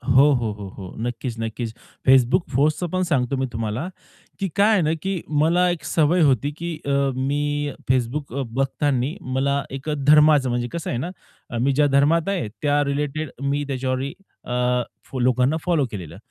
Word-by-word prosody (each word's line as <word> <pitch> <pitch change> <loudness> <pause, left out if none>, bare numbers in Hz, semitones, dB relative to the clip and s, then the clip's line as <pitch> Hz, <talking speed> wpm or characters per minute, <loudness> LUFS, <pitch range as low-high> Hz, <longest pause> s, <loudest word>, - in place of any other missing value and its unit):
हो, 140 +3 +7
हो, 120 -4 0
हो, 105 -1 -8
हो. 95 -2 -8
नक्कीच, 120 0 -4
नक्कीच. 115 0 -4 0.4
Facebook 130 +5 +5
पोस्टच 155 +6 +2
पण 185 0 +1
सांगतो 135 -6 0
मी 130 - 0
तुम्हाला 110 +7 -2 0.5
की 195 - 0
काय 205 +1 +4
आहे 200 - +4
ना, 155 0 +1
की 190 -3 -2 0.2
मला 175 +3 +3
एक 175 -2 -3
सवय 165 +2 +2
होती 140 -1 +2
की 170 0 -4
अ, 140 - -1 0.2
मी 145 +2 -1 0.2
Facebook 130 +2 -1
अ, - - 0
बघताना 135 +1 0 0.2
मला 140 +1 +1
एक 135 +3 -7
अ, - - +1
धर्माचं 150 -3 +6
म्हणजे 120 0 -1
कसं 170 - -4
आहे 120 - -1
ना, 170 - -3 0.5
मी 135 +4 +2
ज्या 145 +2 +3
धर्मात 160 +6 +3
आहे 185 - -1
त्या 145 0 +2
रिलेटेड 145 +2 -2
मी 140 +1 0
त्याच्यावर 130 -1 -1 0.4
अ, 125 0 +1 0.2
फो 130 - -6
लोकांना 125 +4 +2
फॉलो 165 -6 +2
केलेलं. 90 -8 -7
140 Hz, 175 wpm, -23 LUFS, 125-155 Hz, 0.5 s, हो